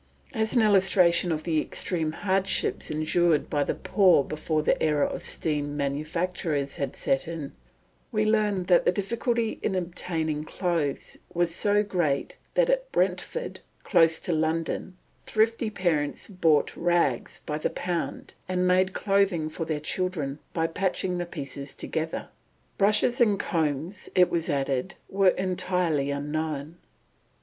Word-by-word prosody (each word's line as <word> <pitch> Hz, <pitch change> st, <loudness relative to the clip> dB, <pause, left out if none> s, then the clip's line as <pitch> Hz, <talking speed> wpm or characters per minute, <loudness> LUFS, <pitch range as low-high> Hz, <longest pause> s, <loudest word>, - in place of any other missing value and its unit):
As 220 Hz, 0 st, 0 dB
an 235 Hz, -, +5 dB
illustration 185 Hz, -4 st, +4 dB
of 155 Hz, -1 st, -2 dB
the 160 Hz, -3 st, +1 dB
extreme 160 Hz, -2 st, -1 dB
hardships 195 Hz, +2 st, 0 dB
endured 155 Hz, +1 st, +1 dB
by 145 Hz, -1 st, +2 dB
the -, -, -2 dB
poor 185 Hz, -8 st, +4 dB
before 155 Hz, +1 st, -2 dB
the -, -, +1 dB
era 150 Hz, -2 st, +2 dB
of -, -, -4 dB
steam 145 Hz, -2 st, -2 dB
manufactures 150 Hz, +1 st, -2 dB
had 140 Hz, -2 st, -3 dB
set 135 Hz, +2 st, 0 dB
in, 160 Hz, -4 st, -5 dB, 0.6 s
we 215 Hz, -2 st, +1 dB
learn 210 Hz, -3 st, +2 dB
that 180 Hz, -1 st, +4 dB
the -, -, +5 dB
difficulty 230 Hz, +4 st, -1 dB
in 195 Hz, -, -1 dB
obtaining 165 Hz, -4 st, -2 dB
clothes 165 Hz, -4 st, -2 dB, 0.2 s
was 170 Hz, -1 st, +1 dB
so 205 Hz, +3 st, +2 dB
great 170 Hz, -9 st, -1 dB, 0.2 s
that -, -, +4 dB
at -, -, 0 dB
Brentford, -, -, -1 dB, 0.2 s
close 165 Hz, -4 st, +4 dB
to 175 Hz, -, -1 dB
London, 160 Hz, +3 st, -1 dB, 0.3 s
thrifty 225 Hz, +1 st, +1 dB
parents 170 Hz, -8 st, -1 dB
bought 165 Hz, -7 st, +2 dB
rags 170 Hz, -8 st, 0 dB
by 150 Hz, 0 st, -3 dB
the -, -, 0 dB
pound, 175 Hz, -2 st, -4 dB, 0.2 s
and 180 Hz, 0 st, +1 dB
made 185 Hz, +1 st, +3 dB
clothing 195 Hz, -6 st, +1 dB
for 165 Hz, +1 st, -4 dB
their 155 Hz, -2 st, -2 dB
children 155 Hz, -3 st, -2 dB
by 165 Hz, -, 0 dB
patching 180 Hz, +1 st, -1 dB
the 175 Hz, -, -3 dB
pieces 140 Hz, -3 st, -7 dB
together. 160 Hz, 0 st, -3 dB, 0.5 s
Brushes 215 Hz, +5 st, +3 dB
and 210 Hz, -4 st, +4 dB
combs, 160 Hz, +3 st, -2 dB
it 180 Hz, -1 st, +4 dB
is 165 Hz, -1 st, 0 dB
added, 135 Hz, +4 st, -1 dB
were 195 Hz, -1 st, +4 dB
entirely 180 Hz, -6 st, 0 dB
unknown. 150 Hz, +2 st, -3 dB
170 Hz, 140 wpm, -26 LUFS, 155-190 Hz, 0.6 s, an